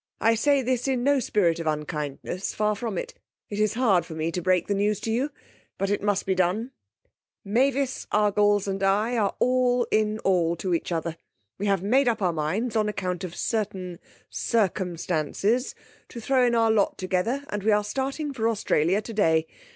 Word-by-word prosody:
I 225 Hz, -, +4 dB
say 275 Hz, +4 st, +2 dB
this 250 Hz, +1 st, -1 dB
in 255 Hz, -2 st, 0 dB
no 285 Hz, +1 st, +3 dB
spirit 175 Hz, -8 st, +1 dB
of 165 Hz, -, -4 dB
unkindness; 150 Hz, +3 st, -3 dB
far 210 Hz, 0 st, +1 dB
from 220 Hz, -2 st, -4 dB
it. -, -, -4 dB, 0.4 s
It 205 Hz, -, -3 dB
is 215 Hz, 0 st, +1 dB
hard 210 Hz, -9 st, +3 dB
to 160 Hz, -, -8 dB
me 160 Hz, +1 st, -2 dB
to 180 Hz, -, -3 dB
break 180 Hz, 0 st, +2 dB
the 205 Hz, -, -1 dB
news 205 Hz, +1 st, +1 dB
to 225 Hz, -, -2 dB
you, 255 Hz, +6 st, 0 dB, 0.5 s
but 195 Hz, 0 st, -1 dB
it 205 Hz, -, 0 dB
must 205 Hz, -1 st, 0 dB
be 190 Hz, -, +1 dB
done. 185 Hz, +7 st, 0 dB, 0.7 s
'Mavis 260 Hz, +5 st, 0 dB
Argles 205 Hz, -1 st, +3 dB
and 195 Hz, 0 st, -2 dB
I 205 Hz, +5 st, +2 dB
are 205 Hz, -4 st, 0 dB
all 250 Hz, -1 st, +2 dB
in 215 Hz, 0 st, +2 dB
all 170 Hz, -3 st, +2 dB
to 180 Hz, +1 st, -2 dB
each 170 Hz, -, -2 dB
other. 165 Hz, 0 st, -2 dB, 0.4 s
We 205 Hz, -, -1 dB
have 195 Hz, -2 st, +1 dB
made 255 Hz, +6 st, +3 dB
up 235 Hz, -, +1 dB
our 180 Hz, -4 st, +1 dB
minds 185 Hz, +11 st, -2 dB
on 215 Hz, -1 st, +2 dB
account 185 Hz, -3 st, -3 dB
of 175 Hz, -2 st, -6 dB
certain 190 Hz, -5 st, -3 dB, 0.3 s
circumstances 190 Hz, -, -1 dB, 0.3 s
to 235 Hz, -, -8 dB
throw 255 Hz, +1 st, +2 dB
in 235 Hz, -, +1 dB
our 225 Hz, -1 st, +3 dB
lot 210 Hz, -2 st, +1 dB
together, 190 Hz, +10 st, -1 dB
and 210 Hz, -, -3 dB
we 215 Hz, +2 st, +2 dB
are 210 Hz, 0 st, +3 dB
starting 275 Hz, +6 st, -3 dB
for 230 Hz, -3 st, 0 dB
Australia 195 Hz, -2 st, +1 dB
today. 165 Hz, -9 st, +1 dB
205 Hz, 190 wpm, -25 LUFS, 180-235 Hz, 0.7 s, I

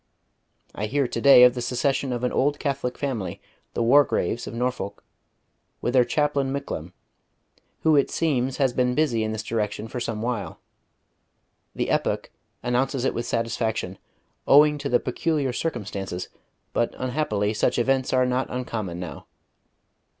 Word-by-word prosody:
I 105 Hz, -, -3 dB
hear 140 Hz, +3 st, +1 dB
to -, -, -4 dB
day 140 Hz, -3 st, +8 dB
of 125 Hz, -1 st, +7 dB
the 125 Hz, -, -4 dB
secession 135 Hz, +2 st, 0 dB
of 120 Hz, 0 st, -3 dB
an 125 Hz, -, +1 dB
old 145 Hz, +2 st, +1 dB
Catholic 140 Hz, -4 st, -2 dB
family, 115 Hz, -11 st, -3 dB, 0.4 s
the 120 Hz, -, +1 dB
Wargraves 120 Hz, -4 st, +3 dB
of -, -, -6 dB
Norfolk, 120 Hz, -5 st, -3 dB, 0.8 s
with 120 Hz, -, -2 dB
their 130 Hz, -2 st, +6 dB
chaplain 140 Hz, +1 st, 0 dB
Micklem, 90 Hz, -, -5 dB, 0.9 s
who 160 Hz, -1 st, +4 dB
it 140 Hz, -, +3 dB
seems 135 Hz, -5 st, 0 dB
has 135 Hz, -3 st, +2 dB
been 125 Hz, 0 st, +1 dB
busy 145 Hz, -8 st, +2 dB
in 110 Hz, -, -2 dB
this 110 Hz, 0 st, -4 dB
direction 110 Hz, -1 st, -2 dB
for 125 Hz, -, -5 dB
some 115 Hz, -2 st, -3 dB
while. 110 Hz, -8 st, -3 dB, 1.2 s
The -, -, -1 dB
Epoch -, -, 0 dB, 0.3 s
announces 125 Hz, +1 st, 0 dB
it -, -, +1 dB
with 120 Hz, -, -3 dB
satisfaction, 115 Hz, -4 st, -2 dB, 0.5 s
owing 150 Hz, +1 st, +6 dB
to 140 Hz, 0 st, -3 dB
the 120 Hz, -, +4 dB
peculiar 140 Hz, 0 st, -1 dB
circumstances; 100 Hz, -, -4 dB, 0.4 s
but 120 Hz, -, 0 dB
unhappily 125 Hz, -6 st, -1 dB
such -, -, +1 dB
events 130 Hz, +2 st, +1 dB
are 130 Hz, -1 st, +3 dB
not 125 Hz, +1 st, 0 dB
uncommon 110 Hz, -8 st, -4 dB
now.... 90 Hz, -2 st, -7 dB
125 Hz, 150 wpm, -25 LUFS, 110-135 Hz, 1.2 s, day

